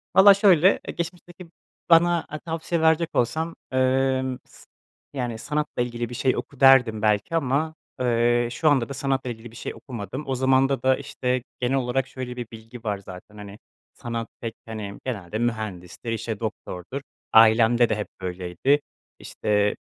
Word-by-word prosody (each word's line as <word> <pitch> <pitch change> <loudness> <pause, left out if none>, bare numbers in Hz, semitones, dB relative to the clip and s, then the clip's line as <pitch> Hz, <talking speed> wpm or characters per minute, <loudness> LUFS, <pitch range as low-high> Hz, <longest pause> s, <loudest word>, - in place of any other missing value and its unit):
Valla 200 +1 +9
şöyle, 195 -2 +5
eee, - - -4
geçmişteki 175 0 -7 0.4
bana 170 0 +4 0.2
tavsiye 165 0 -2
verecek 160 +1 +3
olsam, 160 +7 0 0.2
emm, 130 0 +1
s - - -18 0.5
yani 120 -4 -3
sanatla 150 0 -2
ilgili 120 -1 -4
bir 120 - -7
şey 130 +2 +1
oku 140 - -7
derdim 125 -5 +6
belki 105 +8 +1
ama, 155 +1 0 0.3
ııı, 120 0 +2
şu 155 +5 +2
anda 135 -4 +2
da 140 - -4
sanatla 135 -1 -1
ilgili 115 -1 -8
bir - - -16
şey - - -5
okumadım. 125 +3 -7
O 135 - -1
zamanda 130 0 +2
da, 130 0 +4
işte, 130 -3 -2 0.2
genel 125 +2 0
olarak 130 0 0
şöyle 125 -1 -6
bir 120 -2 -5
bilgi 115 +1 -11
var 105 -3 -1
zaten, 100 +2 -12
hani, 105 0 -10 0.3
sanat 115 -1 -5
pek, 115 -1 -5
hani, 105 -3 -6
genelde 105 -5 -4
mühendisti, 110 -3 -4
işte 115 -2 -3
doktordur, 110 +2 -5 0.3
ailemde 115 +1 +6
de 110 - +1
hep 105 -1 -4
böyleydi, 90 - 0 0.4
işte, 105 -1 0
125 Hz, 155 wpm, -24 LUFS, 110-140 Hz, 0.5 s, Valla